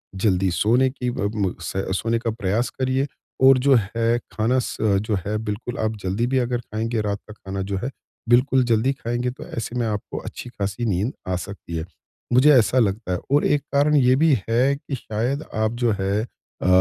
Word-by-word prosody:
जल्दी 95 Hz, -1 st, +2 dB
सोने 120 Hz, +8 st, +3 dB
की 125 Hz, -1 st, -3 dB
ब 100 Hz, -3 st, -2 dB
म 100 Hz, -4 st, 0 dB
स -, -, -5 dB, 0.2 s
सोने 115 Hz, 0 st, 0 dB
का 115 Hz, -1 st, -1 dB
प्रयास 110 Hz, +2 st, -1 dB
करिए 130 Hz, +1 st, -1 dB, 0.4 s
और 135 Hz, 0 st, +8 dB
जो 135 Hz, +1 st, +4 dB
है 115 Hz, +2 st, +1 dB, 0.2 s
खाना 115 Hz, +4 st, +2 dB
स -, -, -5 dB, 0.3 s
जो 105 Hz, -, +1 dB
है 105 Hz, +1 st, -1 dB
बिल्कुल 105 Hz, +3 st, -4 dB
आप 110 Hz, 0 st, 0 dB
जल्दी 100 Hz, +6 st, 0 dB
भी 130 Hz, +1 st, +1 dB
अगर 125 Hz, 0 st, 0 dB
खाएँगे, 115 Hz, 0 st, -2 dB
रात 100 Hz, -1 st, -2 dB
का -, -, -8 dB
खाना 95 Hz, -2 st, -6 dB
जो 95 Hz, 0 st, -2 dB
है 120 Hz, +7 st, -3 dB, 0.4 s
बिल्कुल 130 Hz, +2 st, +4 dB
जल्दी 120 Hz, +3 st, +2 dB
खाएँगे 120 Hz, 0 st, -2 dB
तो 130 Hz, -, -10 dB
ऐसे 115 Hz, +1 st, -5 dB
में 115 Hz, -, 0 dB
आपको 105 Hz, -1 st, -4 dB
अच्छी 120 Hz, -, -8 dB
खासी 100 Hz, +1 st, -3 dB
नींद 105 Hz, +5 st, 0 dB
आ 95 Hz, -, 0 dB
सकती 90 Hz, -1 st, -7 dB
है। 80 Hz, -, -3 dB, 0.5 s
मुझे 130 Hz, +5 st, +7 dB
ऐसा 125 Hz, +1 st, +4 dB
लगता 100 Hz, -3 st, 0 dB
है 90 Hz, -, -1 dB
और 145 Hz, -, +4 dB
एक 145 Hz, -1 st, +2 dB
कारण 145 Hz, +2 st, +4 dB
ये 130 Hz, -3 st, +5 dB
भी 155 Hz, +2 st, +4 dB, 0.2 s
है 130 Hz, +5 st, +3 dB
कि 140 Hz, 0 st, -6 dB
शायद 125 Hz, +5 st, -2 dB
आप 110 Hz, 0 st, +1 dB
जो 120 Hz, -2 st, +3 dB
है 100 Hz, +2 st, +1 dB
अ, 115 Hz, -, -8 dB
115 Hz, 205 wpm, -23 LUFS, 105-130 Hz, 0.5 s, और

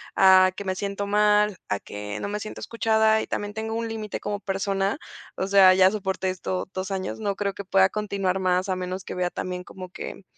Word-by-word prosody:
a 185 Hz, -1 st, +7 dB
que 200 Hz, -, -7 dB
me 190 Hz, -, 0 dB
siento 200 Hz, +1 st, -3 dB
mal, 210 Hz, -1 st, +3 dB
a 100 Hz, -, 0 dB
que 105 Hz, +1 st, -7 dB
no -, -, -3 dB
me 205 Hz, +1 st, -3 dB
siento 215 Hz, -, -7 dB
escuchada 220 Hz, -1 st, +2 dB
y -, -, -6 dB
también 205 Hz, 0 st, -3 dB
tengo 220 Hz, +1 st, -4 dB
un 230 Hz, 0 st, -2 dB
límite 220 Hz, -2 st, -5 dB
como 205 Hz, 0 st, -3 dB
persona, 195 Hz, +2 st, -1 dB, 0.4 s
o -, -, -2 dB
sea, 190 Hz, -1 st, +7 dB
ya 190 Hz, 0 st, +6 dB
soporté 190 Hz, -2 st, -2 dB
esto 185 Hz, 0 st, -3 dB
dos 185 Hz, +1 st, -4 dB
años. 190 Hz, 0 st, -3 dB
No 205 Hz, -2 st, -1 dB
creo 200 Hz, 0 st, -2 dB
que 200 Hz, -, -8 dB
pueda 190 Hz, 0 st, +4 dB
continuar 195 Hz, -2 st, -1 dB
más 185 Hz, 0 st, +1 dB
al 185 Hz, -1 st, -1 dB
menos 185 Hz, +1 st, -4 dB
que -, -, -7 dB
vea 180 Hz, -1 st, -1 dB
también 180 Hz, 0 st, -5 dB
como 185 Hz, 0 st, -10 dB
que 185 Hz, -, -8 dB
195 Hz, 220 wpm, -25 LUFS, 185-210 Hz, 0.4 s, a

